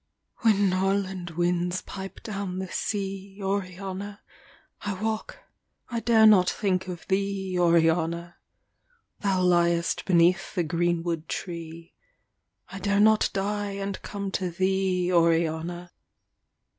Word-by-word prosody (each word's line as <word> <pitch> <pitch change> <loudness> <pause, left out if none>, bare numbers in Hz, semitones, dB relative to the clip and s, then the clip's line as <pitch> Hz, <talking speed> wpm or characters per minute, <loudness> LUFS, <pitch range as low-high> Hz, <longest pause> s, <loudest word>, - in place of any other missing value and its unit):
When 205 -4 +3
Norland 190 -1 -1
winds 175 +1 0
pipe 190 0 -8
down 195 -4 -4
the 190 -1 -4
sea, 195 -1 -3
Oriana, 195 +1 -4 0.6
I 205 -1 -3
walk, 220 +1 -3 0.5
I 235 -2 -2
dare 225 -1 +5
not 195 -4 +6
think 185 -3 -1
of 180 -2 -7
thee, 195 -1 -1
Oriana. 170 0 +2 0.8
Thou 190 -2 +1
liest 170 -1 +2
beneath 180 +2 +3
the 175 - +1
greenwood 170 0 -1
tree, 170 -2 -6 0.8
I 190 - -7
dare 200 +1 +1
not 215 +1 +5
die 205 +1 -2
and 195 0 -4
come 200 -1 -5
to 185 -1 -1
thee, 185 0 0
Oriana. 170 +1 +1
185 Hz, 115 wpm, -26 LUFS, 175-200 Hz, 0.8 s, not